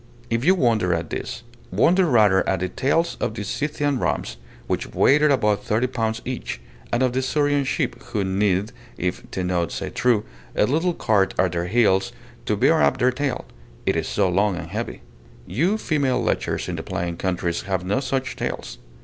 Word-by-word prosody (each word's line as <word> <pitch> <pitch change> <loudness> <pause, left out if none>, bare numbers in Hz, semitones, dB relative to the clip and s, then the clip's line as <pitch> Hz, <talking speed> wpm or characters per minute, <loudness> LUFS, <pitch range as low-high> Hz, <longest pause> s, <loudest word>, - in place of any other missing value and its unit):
If 115 +1 +1
you 185 +5 +5
wonder 110 - +2
at 85 0 -4
this, - - -5 0.3
wonder 170 - +3
rather 105 - +4
at 95 -2 0
the 95 - -1
tails 165 - 0
of 110 - -2
the 105 - -4
Scythian 145 +4 -1
rams, - - -2 0.3
which - - -2
weighed 145 +3 +5
above 130 -9 +3
thirty 110 +4 +1
pounds 115 -2 -2
each; 130 0 -4 0.3
and 120 +2 +2
of 125 -1 +1
the 130 - +1
Surian 145 +1 +1
sheep, - - -1
who 105 - -2
need, 95 +2 +1 0.3
if 90 +1 -3
Tenaud 90 -2 -1
say - - -4
true, 120 -4 +2 0.3
a - - +4
little 165 +8 +1
cart 100 -3 +2
at 95 -2 +2
their 85 0 -2
heels 95 -3 +3 0.4
to - - +1
bear - - +4
up 70 0 +3
their 125 +1 +3
tail, 135 0 -2 0.4
it - - +2
is - - -1
so 100 - +1
long 100 +2 +2
and 85 -1 -6
heavy. 115 +3 -4 0.4
You 165 - +1
female 140 -10 +1
lechers 120 - -1
in - - -3
the - - -3
plain 85 0 -3
countries 90 -1 -1
have 95 -2 -1
no 100 +8 +1
such 135 0 -2
tails. - - -4
110 Hz, 185 wpm, -23 LUFS, 95-135 Hz, 0.4 s, you